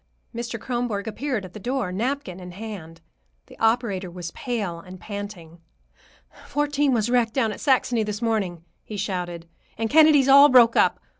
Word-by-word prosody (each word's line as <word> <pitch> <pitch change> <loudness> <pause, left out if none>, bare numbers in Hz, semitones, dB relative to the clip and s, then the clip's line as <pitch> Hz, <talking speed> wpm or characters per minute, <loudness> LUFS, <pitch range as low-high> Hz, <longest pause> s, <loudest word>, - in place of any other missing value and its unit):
Mr. 235 -1 -5
Kronborg 240 -4 -3
appeared 230 -1 -3
at 185 - -12
the 215 - -8
door, 245 -3 -2
napkin 225 -2 -3
in 180 -1 -9
hand. 180 -6 -9 0.4
The - - -17
operator 225 -5 0
was 175 -1 -7
pale 210 -9 -4
and 185 +2 -12
panting. 195 -4 -8 0.9
"Fourteen 290 -1 0
was 225 -3 +1
wrecked 235 -3 +1
down 230 -5 +1
at 205 - -8
Saxony 255 -4 +2
this 210 -1 -3
morning," 200 -8 -2 0.2
he 210 - -7
shouted, 175 -3 -4 0.3
"and 225 -1 -2
Kennedy's 305 -3 +6
all 280 +2 +8
broke 240 -3 +6
up. - - +3
220 Hz, 160 wpm, -24 LUFS, 185-250 Hz, 0.9 s, all